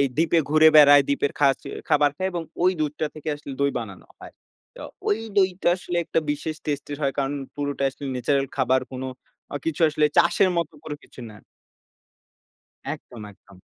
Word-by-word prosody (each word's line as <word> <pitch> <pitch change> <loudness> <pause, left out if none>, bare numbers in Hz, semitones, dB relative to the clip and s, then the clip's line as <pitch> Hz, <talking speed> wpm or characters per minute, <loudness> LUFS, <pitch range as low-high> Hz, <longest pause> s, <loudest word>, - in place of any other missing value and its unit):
এই 140 - +4
দ্বীপে 165 +1 +3
ঘুরে 155 +1 +7
বেড়ায়, 145 -1 +8
দ্বীপের 140 0 0
খাচে 140 -2 +2 0.2
খাবার 145 0 +4
খায় 190 0 -1
এবং 170 -1 -3 0.2
ঐ - - +3 0.2
দুধটা 150 +1 -1
থেকে 155 0 -7
আসলে 145 -1 -9
দই 140 0 +3
বানানো 100 -5 -9
হয়। - - -12 0.4
তো - - -10 0.2
ঐ - - +1 0.3
দইটা 185 -2 +2
আসলে 180 -1 -5
একটা - - -1
বিশেষ 150 +2 -3
টেস্ট 145 -2 -2
এর - - -4
হয়, 135 -1 +1
কারণ 140 +1 0 0.2
পুরোটা 145 -1 -3
আসলে 140 - -11
ন্যাচারাল 135 +2 0
খাবার 130 0 +2
কোন 130 - -5 0.6
কিছু 165 -1 -3
অ - - +7
আসলে 155 0 +1
চাষের 190 - +4
মতো 170 -3 -1
কোনো 150 -1 -5
কিছু - - -14
না। 105 - -13 1.6
একদম, 125 -7 -10
একদম। 95 -1 -20
145 Hz, 180 wpm, -24 LUFS, 135-155 Hz, 1.6 s, বেড়ায়